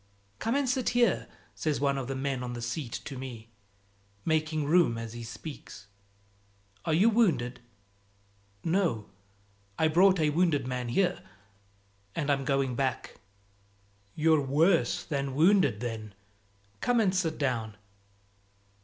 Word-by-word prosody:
"Come 230 Hz, +3 st, 0 dB
and 280 Hz, -1 st, +1 dB
sit 255 Hz, 0 st, +1 dB
here," 235 Hz, -6 st, +2 dB, 0.3 s
says 155 Hz, -2 st, -1 dB
one 140 Hz, 0 st, +1 dB
of 135 Hz, -2 st, -3 dB
the 135 Hz, -, -3 dB
men 135 Hz, -1 st, -2 dB
on 125 Hz, -1 st, -4 dB
the 120 Hz, -, -6 dB
seat 120 Hz, +1 st, -4 dB
to 135 Hz, -3 st, -6 dB
me, 115 Hz, -4 st, -8 dB, 0.7 s
making 155 Hz, -1 st, 0 dB
room 155 Hz, -6 st, +3 dB
as 115 Hz, -1 st, -6 dB
he 120 Hz, -, -7 dB
speaks. 115 Hz, -, -9 dB, 1.0 s
"Are 160 Hz, -, +1 dB
you 195 Hz, +7 st, +5 dB
wounded?" 165 Hz, -, +2 dB, 1.0 s
"No; 165 Hz, -, 0 dB, 0.7 s
I 160 Hz, -, +3 dB
brought 185 Hz, +3 st, +5 dB
a 155 Hz, -1 st, +2 dB
wounded 160 Hz, -3 st, +2 dB
man 125 Hz, -1 st, -3 dB
here, 180 Hz, +7 st, +1 dB, 0.9 s
and 145 Hz, -1 st, 0 dB
I'm 135 Hz, -1 st, 0 dB
going 135 Hz, -2 st, +1 dB
back." 130 Hz, 0 st, -2 dB, 1.0 s
"You're 160 Hz, -1 st, +3 dB
worse 160 Hz, +6 st, +2 dB
than 140 Hz, -3 st, -3 dB
wounded 155 Hz, -, +4 dB
then; 110 Hz, -4 st, -5 dB, 0.6 s
come 245 Hz, -, +2 dB
and 195 Hz, -4 st, +2 dB
sit 170 Hz, -4 st, 0 dB
down." 115 Hz, -6 st, -2 dB
145 Hz, 135 wpm, -29 LUFS, 125-170 Hz, 1.0 s, you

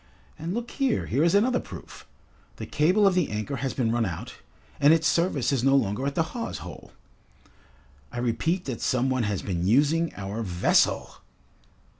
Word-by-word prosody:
And 170 Hz, +5 st, -4 dB
look 240 Hz, 0 st, -4 dB
here, 270 Hz, -5 st, 0 dB
here 140 Hz, +6 st, +1 dB
is 170 Hz, +3 st, +3 dB
another 245 Hz, +5 st, +3 dB
proof! -, -, -11 dB, 0.5 s
The -, -, -7 dB
cable 180 Hz, +8 st, +2 dB
of 195 Hz, -, +5 dB
the 180 Hz, -4 st, +1 dB
anchor 110 Hz, +7 st, -3 dB
has 135 Hz, 0 st, -3 dB
been 115 Hz, -4 st, 0 dB
run 120 Hz, 0 st, +1 dB
out, 85 Hz, -7 st, -5 dB, 0.5 s
and 145 Hz, +2 st, +6 dB
its 165 Hz, 0 st, +1 dB
service 165 Hz, -7 st, +1 dB
is 130 Hz, -4 st, 0 dB
no 135 Hz, +1 st, +4 dB
longer 130 Hz, +1 st, 0 dB
at 140 Hz, -, -3 dB
the 165 Hz, -, +2 dB
hawse 235 Hz, -2 st, -4 dB
hole. -, -, -10 dB, 1.2 s
I -, -, -8 dB
repeat 160 Hz, +10 st, -1 dB
that 125 Hz, -4 st, -5 dB
some 130 Hz, +1 st, +1 dB
one 130 Hz, -1 st, +1 dB
has 100 Hz, -3 st, -2 dB
been 90 Hz, -2 st, -2 dB
using 150 Hz, +8 st, +3 dB
our 100 Hz, +3 st, -5 dB
vessel!" 90 Hz, -5 st, +1 dB
140 Hz, 180 wpm, -26 LUFS, 115-170 Hz, 1.2 s, and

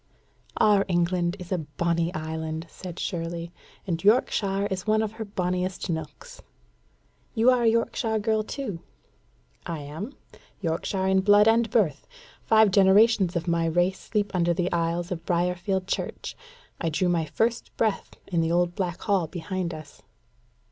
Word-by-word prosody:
"Our 210 Hz, -2 st, +5 dB
England 175 Hz, 0 st, +1 dB
is 180 Hz, -1 st, -10 dB
a 185 Hz, -, +1 dB
bonnie 170 Hz, +3 st, -1 dB
island," 160 Hz, +1 st, -4 dB
said 180 Hz, -2 st, -9 dB
Shirley, 170 Hz, -2 st, -4 dB, 0.3 s
"and 170 Hz, -2 st, -2 dB
Yorkshire 200 Hz, -2 st, +2 dB
is 190 Hz, +2 st, -3 dB
one 215 Hz, 0 st, +3 dB
of 215 Hz, -, -2 dB
her 220 Hz, 0 st, -6 dB
bonniest 180 Hz, -1 st, -2 dB
nooks." 160 Hz, -, -7 dB, 0.9 s
"You 235 Hz, +3 st, +5 dB
are 250 Hz, -1 st, +2 dB
a 235 Hz, -, +3 dB
Yorkshire 225 Hz, 0 st, 0 dB
girl 220 Hz, 0 st, +1 dB
too?" 215 Hz, -5 st, -5 dB, 0.9 s
"I 170 Hz, -, -3 dB
am 160 Hz, -, -7 dB, 0.4 s
Yorkshire 190 Hz, +2 st, -1 dB
in 190 Hz, 0 st, +3 dB
blood 205 Hz, +2 st, +6 dB
and 225 Hz, 0 st, +4 dB
birth. 200 Hz, -, +1 dB, 0.3 s
Five 220 Hz, -2 st, +4 dB
generations 195 Hz, 0 st, +5 dB
of 170 Hz, 0 st, -2 dB
my 170 Hz, -1 st, +1 dB
race 175 Hz, +3 st, +1 dB
sleep 210 Hz, -2 st, -2 dB
under 175 Hz, -1 st, +2 dB
the 180 Hz, +1 st, -1 dB
aisles 170 Hz, +1 st, -1 dB
of 165 Hz, -2 st, -4 dB
Briarfield 180 Hz, +2 st, 0 dB
Church: -, -, -4 dB, 0.4 s
I 165 Hz, -, 0 dB
drew 170 Hz, +4 st, 0 dB
my 170 Hz, -2 st, +1 dB
first 230 Hz, +8 st, -1 dB
breath 220 Hz, -3 st, -1 dB
in 170 Hz, -3 st, 0 dB
the 165 Hz, 0 st, 0 dB
old 175 Hz, 0 st, +2 dB
black 180 Hz, -2 st, -3 dB
hall 195 Hz, -6 st, +1 dB
behind 175 Hz, +2 st, -4 dB
us." 155 Hz, -8 st, -10 dB
180 Hz, 155 wpm, -26 LUFS, 170-205 Hz, 0.9 s, blood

